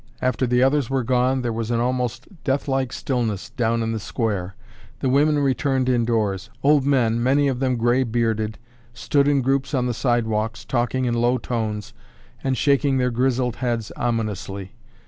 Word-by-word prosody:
After 130 Hz, 0 st, 0 dB
the 125 Hz, +1 st, +3 dB
others 135 Hz, -1 st, +2 dB
were 135 Hz, -1 st, 0 dB
gone, 130 Hz, +2 st, +1 dB
there 120 Hz, -1 st, -1 dB
was 115 Hz, 0 st, -3 dB
an 120 Hz, -1 st, +1 dB
almost 125 Hz, 0 st, -1 dB, 0.2 s
deathlike 135 Hz, -2 st, 0 dB
stillness 120 Hz, -, -2 dB
down 115 Hz, -3 st, 0 dB
in 115 Hz, -, -1 dB
the 110 Hz, -, -2 dB
square. 100 Hz, -4 st, -3 dB, 0.4 s
The 130 Hz, -, 0 dB
women 145 Hz, +3 st, +3 dB
returned 135 Hz, -2 st, +1 dB
indoors. 115 Hz, -4 st, 0 dB
Old 145 Hz, -1 st, +4 dB
men, 120 Hz, -5 st, +2 dB
many 140 Hz, +3 st, +3 dB
of 130 Hz, -3 st, -1 dB
them 130 Hz, -1 st, +1 dB
gray 120 Hz, +3 st, +2 dB
bearded, 110 Hz, -3 st, -1 dB, 0.4 s
stood 140 Hz, +3 st, +1 dB
in 140 Hz, -2 st, +2 dB
groups 135 Hz, +1 st, 0 dB
on 125 Hz, -2 st, +1 dB
the 125 Hz, -, 0 dB
sidewalks 110 Hz, -2 st, -1 dB
talking 130 Hz, +1 st, 0 dB
in 120 Hz, -, 0 dB
low 120 Hz, +2 st, +2 dB
tones 110 Hz, -5 st, -3 dB, 0.5 s
and 130 Hz, -1 st, 0 dB
shaking 140 Hz, 0 st, +2 dB
their 125 Hz, -1 st, +1 dB
grizzled 125 Hz, 0 st, 0 dB
heads 120 Hz, -4 st, -2 dB
ominously. 105 Hz, -5 st, -3 dB
125 Hz, 165 wpm, -22 LUFS, 115-130 Hz, 0.5 s, Old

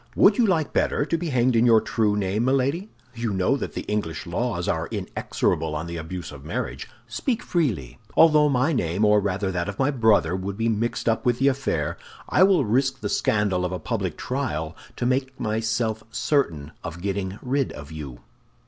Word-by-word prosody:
"Would -, -, +5 dB
you 235 Hz, -, +5 dB
like 160 Hz, -6 st, +1 dB
better 145 Hz, -, +1 dB
to 165 Hz, -, 0 dB
be 165 Hz, 0 st, -2 dB
hanged 125 Hz, -2 st, +2 dB
in 115 Hz, -, +4 dB
your 115 Hz, -2 st, +7 dB
true 110 Hz, -2 st, 0 dB
name, 100 Hz, +2 st, 0 dB
Milady? 135 Hz, +9 st, +1 dB, 0.2 s
You 115 Hz, -1 st, -2 dB
know 95 Hz, +8 st, +2 dB
that -, -, -5 dB
the -, -, -4 dB
English 105 Hz, -6 st, -3 dB
laws -, -, -2 dB
are -, -, 0 dB
inexorable 80 Hz, -1 st, -1 dB
on 75 Hz, +2 st, -3 dB
the 85 Hz, 0 st, -5 dB
abuse 80 Hz, 0 st, -6 dB
of 70 Hz, -2 st, -11 dB
marriage. 65 Hz, -3 st, -4 dB, 0.2 s
Speak 220 Hz, -, -2 dB
freely. 110 Hz, -, -1 dB, 0.2 s
Although 155 Hz, -2 st, +6 dB
my 135 Hz, +4 st, +2 dB
name, 95 Hz, -, +1 dB
or 105 Hz, 0 st, +5 dB
rather 100 Hz, -1 st, -1 dB
that 85 Hz, 0 st, -2 dB
of 100 Hz, -, -6 dB
my 135 Hz, +2 st, +2 dB
brother, 110 Hz, -, +3 dB
would 95 Hz, +1 st, -4 dB
be 115 Hz, +1 st, +1 dB
mixed 115 Hz, +2 st, -1 dB
up 115 Hz, -1 st, +2 dB
with 120 Hz, -1 st, +2 dB
the 135 Hz, +2 st, +4 dB
affair, 85 Hz, -, -2 dB, 0.3 s
I -, -, +2 dB
will 185 Hz, -7 st, +5 dB
risk 130 Hz, +4 st, +1 dB
the 105 Hz, -, -2 dB
scandal 100 Hz, -4 st, +1 dB
of 90 Hz, -, -1 dB
a 90 Hz, -, -2 dB
public 100 Hz, -6 st, -3 dB
trial 95 Hz, -, -3 dB, 0.2 s
to -, -, -2 dB
make 130 Hz, +1 st, 0 dB
myself 110 Hz, 0 st, -1 dB
certain 110 Hz, -, 0 dB
of 85 Hz, +2 st, -7 dB
getting 100 Hz, -1 st, -2 dB
rid 135 Hz, +1 st, 0 dB
of 70 Hz, +1 st, -9 dB
you." 70 Hz, -6 st, -8 dB
110 Hz, 195 wpm, -24 LUFS, 90-130 Hz, 0.3 s, your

